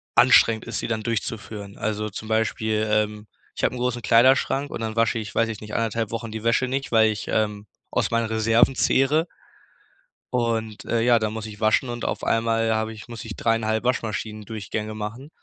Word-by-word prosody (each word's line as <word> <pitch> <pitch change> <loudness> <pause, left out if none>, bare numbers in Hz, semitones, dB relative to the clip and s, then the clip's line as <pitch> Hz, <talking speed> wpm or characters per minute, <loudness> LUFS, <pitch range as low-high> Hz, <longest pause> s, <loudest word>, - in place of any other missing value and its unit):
anstrengend 110 -1 +5
ist, - - -4
sie - - -3
dann 110 -2 -2
durchzuführen. 105 -2 -4
Also, 105 0 -2
zum 110 +2 -8
Beispiel, 110 0 0
ähm, 105 0 0 0.3
ich - - -6
habe - - +2
'n - - -5
großen 125 -1 -1
Kleiderschrank 130 +4 +4
und - - -5
dann 110 -1 -3
wasche 115 0 +2
ich, 105 -2 -7
weiß 115 0 +2
ich 110 -2 -5
nicht, 105 0 -9
1,5 115 -1 -1
Wochen 115 -1 -4
die 110 0 -6
Wäsche 120 +2 +2
nicht, 135 +2 -3
weil 110 -1 +5
ich, 105 - -6
ähm, 105 -1 -1 0.3
aus - - 0
meinen 115 0 +1
Reserven 115 +3 +3
zehre. 145 +7 +2 1.1
Und, 115 -3 -1
äh, 115 - 0
ja, 120 0 +4
dann 110 -1 -2
muss 110 -1 -5
ich 105 -1 -9
waschen 110 +4 +2
und 120 0 -4
auf - - -3
einmal 115 0 +1
habe 110 0 -1
ich 110 +3 -12
muss 115 -2 -7
ich 110 -2 -6
3,5 110 -1 0
Waschmaschinendurchgänge 110 -2 -3
machen 110 +7 -6
110 Hz, 195 wpm, -24 LUFS, 110-115 Hz, 1.1 s, anstrengend